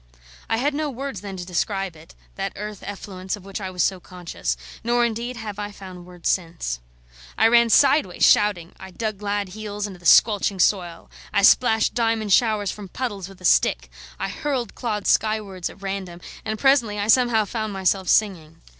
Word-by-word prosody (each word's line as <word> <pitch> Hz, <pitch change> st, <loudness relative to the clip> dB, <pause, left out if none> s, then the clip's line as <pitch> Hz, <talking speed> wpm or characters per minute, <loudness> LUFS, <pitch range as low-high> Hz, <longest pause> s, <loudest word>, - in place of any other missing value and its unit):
I 225 Hz, -, +1 dB
had 280 Hz, +5 st, 0 dB
no 300 Hz, +1 st, -2 dB
words 270 Hz, -6 st, -6 dB
then 195 Hz, -2 st, -7 dB
to 180 Hz, -, -6 dB
describe 190 Hz, +1 st, -2 dB
it, 160 Hz, +1 st, -16 dB, 0.2 s
that 195 Hz, 0 st, -4 dB
earth 210 Hz, 0 st, -7 dB
effluence 190 Hz, -2 st, -5 dB
of 200 Hz, -2 st, -15 dB
which 195 Hz, +1 st, -6 dB
I 190 Hz, -, -4 dB
was 180 Hz, -1 st, 0 dB
so 190 Hz, -2 st, 0 dB
conscious; 175 Hz, -, -5 dB, 0.3 s
nor, 240 Hz, +1 st, +2 dB
indeed, 235 Hz, +2 st, -3 dB
have 210 Hz, -3 st, -6 dB
I 205 Hz, 0 st, -4 dB
found 185 Hz, -3 st, -11 dB
words 180 Hz, -1 st, -7 dB
since. 165 Hz, -, -1 dB, 0.6 s
I -, -, +5 dB
ran 235 Hz, 0 st, +5 dB
sideways, 265 Hz, -, +4 dB
shouting; 190 Hz, -5 st, +3 dB
I 190 Hz, -, -9 dB
dug 215 Hz, +2 st, -4 dB
glad 205 Hz, -1 st, -2 dB
heels 210 Hz, +1 st, -5 dB
into 190 Hz, -3 st, -8 dB
the 175 Hz, -, -3 dB
squelching 205 Hz, -2 st, +5 dB
soil; 175 Hz, -3 st, 0 dB, 0.2 s
I 200 Hz, -, +1 dB
splashed 220 Hz, +1 st, +4 dB
diamond 225 Hz, -4 st, +1 dB
showers 215 Hz, -4 st, +2 dB
from 205 Hz, -2 st, -9 dB
puddles 205 Hz, -5 st, -4 dB
with 190 Hz, -1 st, -15 dB
a -, -, -7 dB
stick; -, -, +2 dB, 0.3 s
I -, -, -2 dB
hurled 265 Hz, -2 st, -3 dB
clods 215 Hz, -5 st, -1 dB
skywards 210 Hz, -4 st, 0 dB
at 200 Hz, -, -15 dB
random, 190 Hz, -3 st, -5 dB, 0.2 s
and 220 Hz, 0 st, -3 dB
presently 240 Hz, -5 st, +3 dB
I 205 Hz, 0 st, -2 dB
somehow 230 Hz, -2 st, +4 dB
found 215 Hz, 0 st, -4 dB
myself 190 Hz, -1 st, 0 dB
singing. 165 Hz, -7 st, +1 dB
205 Hz, 185 wpm, -23 LUFS, 185-225 Hz, 0.6 s, I